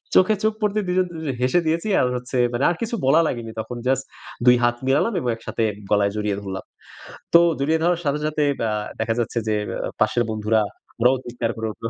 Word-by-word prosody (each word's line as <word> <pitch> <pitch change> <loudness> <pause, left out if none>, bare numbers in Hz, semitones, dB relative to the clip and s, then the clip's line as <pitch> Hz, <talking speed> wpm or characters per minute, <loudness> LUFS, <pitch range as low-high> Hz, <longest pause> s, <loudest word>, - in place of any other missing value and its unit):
চোখে 185 +4 +5
চোখ 220 - +2
পড়তে 210 0 +1
দুজন, 185 +1 +2
দুজনে 160 -4 -4
হেসে 130 +8 +3
দিয়েছি। 165 +6 0
আর 125 - +2
হচ্ছে 125 +1 -4 0.2
মানে 120 +3 -1
আর 175 - 0
কিছু 230 +1 -2
বলা 155 +5 +6
লাগেনি 115 -4 -4
তখন। 120 +2 -7
জাস্ট 130 0 +3 0.5
২ 125 0 +8
হাত 120 0 +3
মিলালাম 145 +12 +2
এবং 125 - -1
একসাথে 115 0 -3 0.3
গলায় 100 -1 +3
জড়িয়ে 105 -2 -1
ধরলাম। 95 -1 -6 0.7
তো 170 - +9 0.2
জড়িয়ে 155 +4 +1
ধরার 175 0 +2
সাথে, 145 +1 +1
সাথে 150 -1 0 0.2
ব্যা 110 - 0 0.3
দেখা 110 0 0
যাচ্ছে 120 0 -1
যে 105 - +2
অ্যা - - -3
পাশের 110 +2 +3
বন্ধুরা, 110 0 +1 0.4
ওরাও 125 +3 +5
চিৎকার 120 -1 -2
করে 110 0 -2
উঠলো 115 - -5
125 Hz, 200 wpm, -22 LUFS, 115-160 Hz, 0.7 s, তো